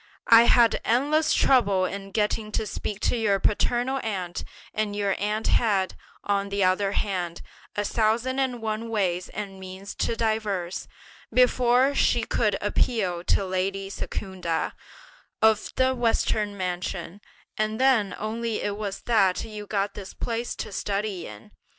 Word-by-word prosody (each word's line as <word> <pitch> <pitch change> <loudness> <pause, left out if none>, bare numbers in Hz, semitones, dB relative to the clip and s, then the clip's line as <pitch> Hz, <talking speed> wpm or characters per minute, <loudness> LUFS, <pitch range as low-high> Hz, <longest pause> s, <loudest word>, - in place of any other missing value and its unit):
I 230 +1 +9
had 235 -1 +5
endless 290 +7 +2
trouble 200 -8 +4
in 195 +1 -5
getting 215 +1 -1
to 220 - 0
speak 210 0 -5
to - - +1
your 210 -4 +2
paternal 245 +6 +1
aunt; 185 -7 -3 0.3
and 210 -1 -1
your 200 -2 0
aunt 210 +2 -1
had, 200 -5 +2 0.3
on 200 0 0
the 200 0 0
other 195 +2 +2
hand, 180 -5 -2 0.3
a 205 - -1
thousand 230 +5 +1
and 250 -4 -1
one 220 +1 -2
ways 185 -5 0
and 195 -2 -6
means 190 +1 -8
to 230 - -1
devise, 215 -6 -1 0.4
before 250 +1 +4
she 240 -4 +2
could 215 -1 +1
appeal 200 -4 0
to 195 - +2
lady 195 +1 -2
Secunda, 185 -5 -3 0.7
of 220 -1 +3
the 260 0 +3
Western 220 -4 0
mansion; 180 0 -4 0.3
and 215 +1 -1
then 240 -8 +3
only 225 +1 -3
it 205 0 -2
was 205 -2 -4
that 200 -6 +2
you 210 -2 -8
got 200 -1 -1
this 195 -2 -9
place 235 0 -3
to - - -6
study 200 -2 -2
in. 105 -1 -12
210 Hz, 145 wpm, -26 LUFS, 195-230 Hz, 0.7 s, I